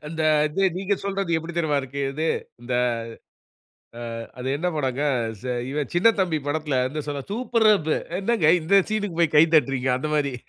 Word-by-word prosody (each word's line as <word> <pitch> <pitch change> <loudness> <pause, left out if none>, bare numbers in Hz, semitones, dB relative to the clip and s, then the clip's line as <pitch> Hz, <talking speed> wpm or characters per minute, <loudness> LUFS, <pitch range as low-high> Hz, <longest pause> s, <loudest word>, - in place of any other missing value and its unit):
அந்த 160 +1 -3 0.3
இது 195 +6 -2
நீங்க 195 +2 0
சொல்றது 195 -3 -1
எப்புடி 165 +1 -5
தெரியுமா 155 -4 +1
இருக்கு 135 +1 -6
இது, 160 +3 -1 0.3
இந்த 125 +1 -4 1.4
அ 115 - -5 0.2
அது 125 - -4
என்ன 180 +4 -1
படங்க 135 -2 -1 0.4
ச 125 -1 -3 0.2
இவன் 145 -2 -3
சின்னத்தம்பி 185 -3 +3
படத்ல 145 -2 0
வந்து 145 +3 -4
சொல்வா 140 -2 -4
"சூப்பர் 230 -1 +1
அப்பு" 160 -5 -1 0.2
"என்னங்க 195 -6 +3
இந்த 195 +5 +4
சீனுக்கு 205 -6 -2
போய் 165 -3 +2
கை 150 - +8
தட்டுறீங்க!" 135 -3 +2
அந்த 150 +4 -4
மாரி. 140 -3 0
155 Hz, 165 wpm, -24 LUFS, 140-190 Hz, 1.4 s, கை